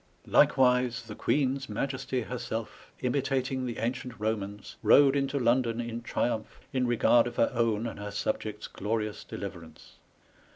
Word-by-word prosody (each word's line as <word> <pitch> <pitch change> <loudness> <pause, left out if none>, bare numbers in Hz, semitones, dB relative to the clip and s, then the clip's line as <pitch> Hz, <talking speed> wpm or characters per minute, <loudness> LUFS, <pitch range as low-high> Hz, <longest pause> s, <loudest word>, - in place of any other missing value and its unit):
'' - - -31
Like - - +5
wise 125 -2 +3
the 115 -2 -8
Queenes 135 +2 0
Maiesty 130 -3 -2
herself, 120 -2 -5
imitating 130 0 0
the 120 - -4
ancient 125 +1 -3
Bomans, 105 -1 -3
rode 135 +5 +6
into 135 0 0
London 120 -2 +2
in 120 0 -4
triumph, 115 -2 -2
in 130 -2 +1
regard 120 0 +4
of 120 - -6
her - - +2
own 115 -2 +1
and 115 - -5
her 105 0 -5
subjects 105 +1 -3
glorious 105 +1 -3
deliverance. 90 -5 -9
120 Hz, 150 wpm, -29 LUFS, 110-130 Hz, -, rode